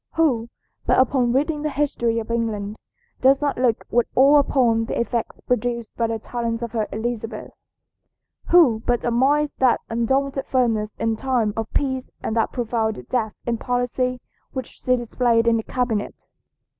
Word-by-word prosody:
Who, 255 -8 +2 0.4
but - - +4
upon 255 -1 +3
reading 295 +4 0
the 305 - -1
history 270 -5 0
of 230 0 -3
England, 215 -3 -2 0.4
does 270 +1 +5
not 285 -4 -1
look 245 -3 +1
with 240 0 +2
awe 280 +3 +7
upon 235 -5 +2
the - - -3
effects 235 -1 -2
produced 240 -2 -2
by 230 - 0
the 225 0 -2
talents 230 +1 -3
of 235 - -4
her 220 -2 -1
Elizabeth? 225 +1 -4 1.0
Who 285 -11 +5
but 240 -1 +1
admires 280 +5 +2
that 255 -2 +4
undaunted 270 +4 0
firmness 225 -5 0
in 225 -1 -1
time 240 -4 0
of 225 -1 -4
peace 260 -2 -1
and 220 - -2
that 225 - +1
profound 225 -3 -2
depth 225 -4 -1
of 235 -1 0
policy 250 0 -1 0.3
which 260 -3 -4
she 255 - 0
displayed 235 -1 +1
in 230 -1 +4
the - - -1
cabinet? 230 -3 -3
240 Hz, 160 wpm, -22 LUFS, 225-260 Hz, 1.0 s, awe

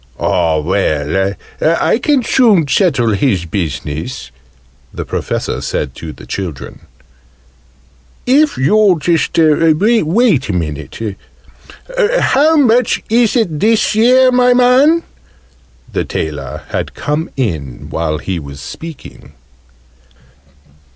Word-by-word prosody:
"Ah, 80 -1 +1
well, 95 +3 -1 0.3
I 165 +7 +2
can 280 -1 +1
soon 215 - +3
settle 135 - +2
his 100 -4 0
business," 80 - -5 0.6
the - - -6
Professor - - -3
said - - -3
to - - -7
the - - -13
children, 90 -8 -7 1.4
"if 285 +4 +3
you'll 200 +8 +3
just 165 +2 0
wait 165 - +2
a - - -1
minute. 80 -5 -4 1.2
How 310 +4 +3
much 245 -4 +2
is 235 0 +3
it, 175 -11 0
this 220 +2 +2
year, 255 +4 +4
my 250 0 +3
man?" 265 +7 +4 0.9
The - - 0
tailor 75 -2 -5
had - - -4
come 150 +3 -3
in 80 - -3
while 80 -2 -2
he 90 +2 -4
was 70 -2 -10
speaking. 130 - -10
155 Hz, 105 wpm, -14 LUFS, -, 1.4 s, year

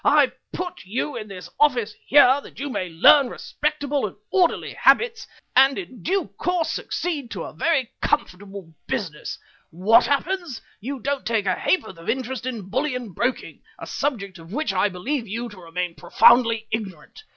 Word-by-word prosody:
"I - - +5 0.2
put 360 -1 -5
you 245 +8 -3
in 215 -3 -6
this 190 -3 -9
office 245 -7 +3
here 285 0 +6
that - - -14
you 285 +1 -3
may 185 -7 -3
learn 245 - +6
respectable 290 -4 -2
and 190 - -11 0.2
orderly 365 -3 +1
habits 465 -1 +3 0.3
and 270 +1 +6
in 300 -10 -8
due 385 +3 0
course 350 -3 0
succeed 300 -8 -3
to 190 -6 -5
a - - -8
very 265 - 0
comfortable 195 - -2
business. 190 - -4 0.3
What 215 +8 +4
happens? 330 -1 -1 0.2
You 265 +4 -5
don't 280 +1 -2
take 220 -2 0
a 185 - +2
ha'porth 190 - -1
of 165 - -7
interest 255 0 -2
in 225 -7 -5
bullion 250 0 -2
broking, 240 +7 -2 0.2
a - - -8
subject 200 -10 -3
of 165 +1 -13
which 245 -4 -1
I 195 +2 +2
believe 230 +7 -3
you 235 +4 -4
to 205 - -13
remain 175 0 -4
profoundly 230 +4 +4
ignorant. 195 - -5
245 Hz, 165 wpm, -23 LUFS, 195-285 Hz, 0.3 s, here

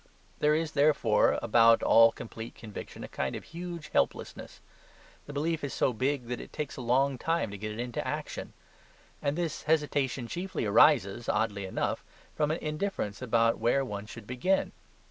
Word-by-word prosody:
There 150 0 +3
is, 160 0 -1
therefore, 140 -8 +3
about 115 0 +5
all 115 0 +7
complete 115 0 -8
conviction 110 -3 -9
a - - -6
kind 65 - -3
of - - -6
huge 170 -2 -7
helplessness. - - -2 0.7
The - - -6
belief 155 +3 -1
is 140 - -3
so 130 - +2
big 130 +3 -1
that 120 0 -4
it - - -11
takes 150 -3 -4
a - - -6
long 130 +2 +2
time 165 -8 0
to 100 - -6
get 110 +1 -4
it 105 - -7
into 120 -1 -3
action. - - -5 0.7
And 140 +2 -1
this 170 -3 -2
hesitation 145 -5 0
chiefly 180 -1 -3
arises, 115 -1 +4
oddly 105 -2 0
enough, - - -2 0.3
from 150 -1 +1
an 155 - 0
indifference 150 - -3
about 115 -2 +2
where 120 +4 +2
one 105 -3 -6
should 115 -1 -10
begin. 130 - 0
130 Hz, 170 wpm, -29 LUFS, 115-150 Hz, 0.7 s, all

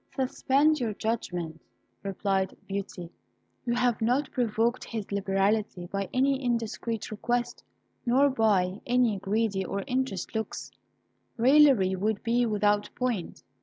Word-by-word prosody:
"Suspend 275 +3 +2
your 225 -4 -2
judgment," 175 -8 -3 0.4
replied 195 -1 -1
Beauty; 195 -3 -5 0.6
"you 240 - +1
have 245 -2 +1
not 250 +5 +1
provoked 235 0 0
his 220 -4 -6
liberality 195 -1 0
by 195 +1 -3
any 270 +1 +1
indiscreet 230 -2 -2
request 240 +3 -2 0.4
nor 265 +3 +4
by 200 -5 +1
any 240 -4 +2
greedy 200 0 0
or 195 +2 -3
interested 260 -8 -2
looks. 220 -1 -4 0.7
Raillery 250 -6 +5
would 205 +2 -1
be 235 +1 +2
without 210 -1 +1
point. 245 -8 -3
220 Hz, 120 wpm, -28 LUFS, 195-245 Hz, 0.7 s, Raillery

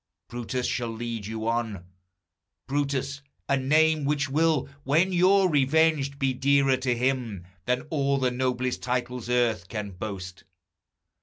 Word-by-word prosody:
Brutus 120 +1 -3
shall 120 -2 -1
lead 115 -2 -5
you 110 0 -4
on; 115 -6 -2 0.8
Brutus, 140 0 -1 0.3
a 140 - +3
name 155 +3 +3
Which 140 -1 0
will, 155 -1 +2 0.2
when 165 +7 +2
you're 190 +2 +5
revenged, 145 -1 +2
be 135 -1 +1
dearer 135 0 +3
to 125 -2 -1
him 120 -7 -1 0.2
Than 125 0 +1
all 140 -3 +1
the 130 -2 +1
noblest 125 0 -1
titles 125 -1 -3
earth 115 -6 +1
can 105 -1 -5
boast. 95 -1 -7
130 Hz, 135 wpm, -26 LUFS, 120-140 Hz, 0.8 s, you're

